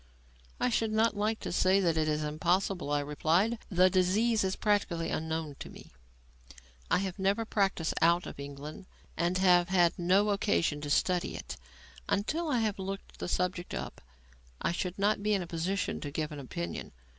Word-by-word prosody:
"I - - +2
should 225 -2 0
not 220 0 +2
like 215 +2 0
to - - -4
say 185 +2 +3
that 170 -4 +2
it 155 -1 +1
is 150 0 0
impossible," 175 +3 0
I 145 0 +1
replied. 165 +10 +1
"The 185 -1 +5
disease 200 +5 +2
is 190 0 0
practically 195 -6 0
unknown 160 -2 -3
to - - -7
me. - - -13 1.0
I - - +4
have 190 0 -3
never 200 +4 +1
practised 195 -6 0
out 170 +1 +4
of - - -8
England 145 +5 -8 0.3
and 175 +2 0
have 180 -2 +4
had 175 -2 +3
no 190 +4 +3
occasion 170 -7 +1
to 145 - -5
study 180 +4 +1
it. - - -6 0.5
Until 315 +11 0
I 250 -5 +2
have 215 -3 -1
looked 195 +1 -6
the - - -3
subject 180 0 -2
up, - - -6 0.6
I - - 0
should 180 +1 -3
not 205 +1 +1
be 210 0 +2
in 190 - -1
a - - -6
position 175 +4 -2
to 145 - -4
give 155 +1 -3
an 150 - -6
opinion. 85 -11 -5
180 Hz, 180 wpm, -30 LUFS, 160-200 Hz, 1.0 s, The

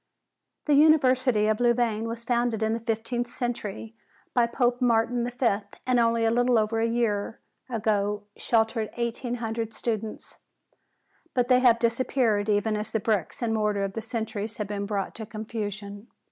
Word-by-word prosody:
The 295 - +3
University 260 -7 +4
of 215 0 +1
Louvain 235 -2 +1
was 230 0 -5
founded 235 -2 0
in 220 0 +1
the 230 - -1
fifteenth 230 +1 -2
century 225 -3 -4 0.4
by 240 -2 +3
Pope 245 +1 0
Martin 235 0 +2
V, 245 -5 +1 0.3
and 255 -1 +3
only 230 0 +2
a 225 - +3
little 245 +1 +3
over 220 +1 +1
a 225 - +2
year 225 -3 -1 0.3
ago 210 -3 0
sheltered 225 -1 +1
eighteen 240 +1 -2
hundred 225 -1 -4
students. 220 -2 -4 1.0
But 245 -1 +1
they 250 -1 +6
have 245 -2 +5
disappeared 230 -3 +1
even 210 +1 +1
as 210 0 -3
the 220 - -1
bricks 210 0 -1
and 225 -1 0
mortar 210 -2 0
of 195 -1 -3
the 225 - -4
centuries 220 -1 -4
have 210 - -2
been 200 0 -3
brought 200 -2 -2
to 220 - -6
confusion. 210 -1 -6
225 Hz, 160 wpm, -26 LUFS, 215-240 Hz, 1.0 s, they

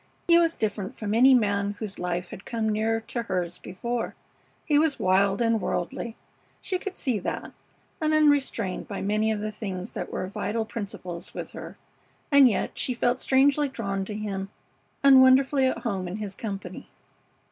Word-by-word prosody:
He 340 0 +7
was 330 -1 +2
different 205 -3 -3
from 210 -1 -3
any 255 +4 +7
man 200 -3 +1
whose 210 -3 -6
life 175 0 -2
had 195 - -9
come 225 -2 -2
near 220 +1 0
to 235 +2 -4
hers 180 -6 -3
before. 235 +6 -4 0.5
He 295 -2 +3
was 305 -2 +2
wild 195 +3 +2
and 230 -2 +2
worldly, 220 +6 -3 0.4
she 370 - -2
could 390 0 -6
see 250 -7 -1
that, - - -4 0.5
and 310 0 +2
unrestrained 285 -10 +2
by 200 - -5
many 215 +2 +1
of 210 -1 -2
the 215 0 -3
things 195 -2 -6
that - - -5
were - - -3
vital 215 +4 -2
principles 195 -6 -7
with - - -6
her, - - -9 0.5
and 280 -2 +8
yet 210 - -2
she 250 - 0
felt 245 +1 +1
strangely 280 +2 +3
drawn 195 -6 -3
to 210 - -5
him 195 -2 -4 0.5
and 270 -1 +8
wonderfully 265 +1 +5
at 260 - 0
home 195 -6 -2
in 175 - -5
his 210 -2 -5
company. 200 -1 -6
220 Hz, 175 wpm, -26 LUFS, 195-260 Hz, 0.5 s, and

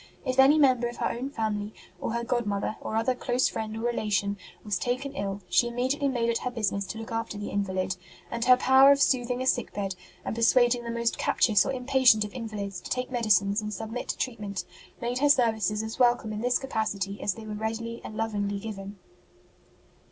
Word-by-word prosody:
If 255 0 -1
any 275 +3 +7
member 255 -5 +4
of 240 - -7
her - - 0
own 255 +3 -4
family, 215 -4 -3 0.2
or - - -3
her 235 0 -1
godmother, 220 -4 -1
or 220 - -4
other 225 +3 +2
close 250 0 +1
friend 220 0 -4
or - - -5
relation, 210 -4 0 0.3
was 205 -4 -1
taken 260 +3 -2
ill, 200 -5 -4
she 240 - +3
immediately 255 +4 0
made 240 -4 0
it 235 0 +1
her 250 - -2
business 200 -5 -2
to - - -6
look 225 +1 -7
after 225 -2 -3
the 205 - -5
invalid; 190 -2 -1 0.3
and 235 -1 -2
her 250 0 +7
power 265 +2 +6
of 280 - +4
sooth 255 -3 +2
ing 250 +1 -1
a - - -4
sick 245 -3 +1
bed, 195 -1 -2 0.3
and - - -3
persuading 240 +1 +3
the - - -4
most 235 0 -1
captious 210 -4 +3
or - - 0
impatient 255 -4 +4
of 205 - -9
invalids 205 -6 -5
to - - -9
take 250 +1 -2
medicines 210 -4 +2
and 210 -1 -4
submit 225 +5 -5
to - - -2
treatment, 210 -6 -4 0.3
made 240 +1 -2
her 290 +1 +3
services 220 -5 +2
as 220 +3 -6
wel 245 -1 +6
come 220 -3 -7
in 210 - -4
this 245 +1 +2
capacity 210 -6 -3
as 200 - 0
they 225 - -9
were 215 - -5
readily 225 +2 -4
and 215 - -8
lovingly 205 -2 -1
given. 200 -1 -7
230 Hz, 210 wpm, -27 LUFS, 210-250 Hz, 0.3 s, any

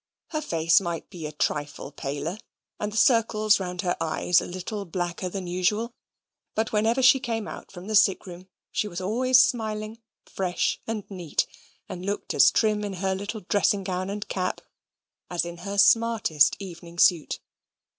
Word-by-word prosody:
Her 310 -2 -2
face 165 - +3
might 170 -3 -5
be 170 -5 -6
a - - -7
trifle 145 -1 -2
paler, 145 +7 -4 0.4
and 210 0 -2
the 215 - -5
circles 220 -4 +4
round 180 -1 -3
her 175 - 0
eyes 170 +2 +2
a - - -6
little 185 +3 -5
blacker 175 0 -3
than 190 0 -5
usual; 195 +7 0 0.6
but 220 +1 0
whenever 225 +5 +2
she 265 +1 +7
came 230 -4 -3
out - - -9
from 180 -1 -10
the 215 +1 -2
sick 205 -1 +4
room 180 0 -10 0.2
she 210 - -1
was 175 -3 -5
always 255 +7 +4
smiling, 220 -3 -2 0.2
fresh, 180 -2 -1
and 220 -2 -3
neat, 175 -5 -1 0.4
and 180 -1 -7
looked 200 +2 -3
as - - +7
trim 215 -2 +1
in 205 -1 -3
her 190 +1 -1
little 205 +3 -5
dressing 200 +1 +1
gown 185 0 -3
and 205 +1 -4
cap, 185 -1 -2 0.7
as 175 -1 0
in 170 0 -7
her 200 +3 -5
smartest 210 -7 +4
evening 170 -3 -10
suit. 170 -2 +3
195 Hz, 170 wpm, -26 LUFS, 175-215 Hz, 0.7 s, she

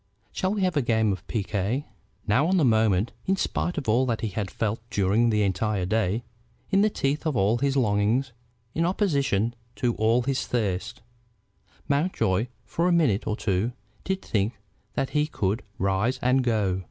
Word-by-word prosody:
Shall 190 +2 -1
we 205 - -1
have 180 -2 +1
a 145 - +3
game 110 -3 +2
of 95 -3 -5
piquet?" 110 +5 -1 0.4
Now 125 +9 +3
on 190 +1 +2
the 160 - +4
moment, 110 -3 +3 0.2
in 190 - +3
spite 175 -2 -2
of 145 - -3
all 120 +4 +3
that 115 -2 -1
he 110 - -1
had 100 0 -3
felt 110 +5 -2
during 105 +3 +2
the 105 -2 +2
entire 100 0 0
day, 110 +2 0 0.5
in 195 0 +4
the 215 - +4
teeth 140 -6 -1
of 145 -6 0
all 105 +5 +2
his 140 +1 +1
longings, 115 +3 +2 0.4
in 165 - 0
opposition 140 - +1 0.2
to 120 -1 0
all 115 +3 +3
his 135 +1 -1
thirst, 105 -3 -2 0.8
Mountjoy 140 - +1 0.2
for 170 +2 0
a - - +3
minute 150 - +2
or 105 - 0
two 105 +4 0 0.3
did 190 0 -2
think 105 +2 0 0.4
that 135 - -1
he 150 0 +1
could 105 -3 -1 0.2
rise 100 +7 +1
and 130 +1 +3
go. 105 -6 +1
115 Hz, 175 wpm, -26 LUFS, 105-140 Hz, 0.8 s, the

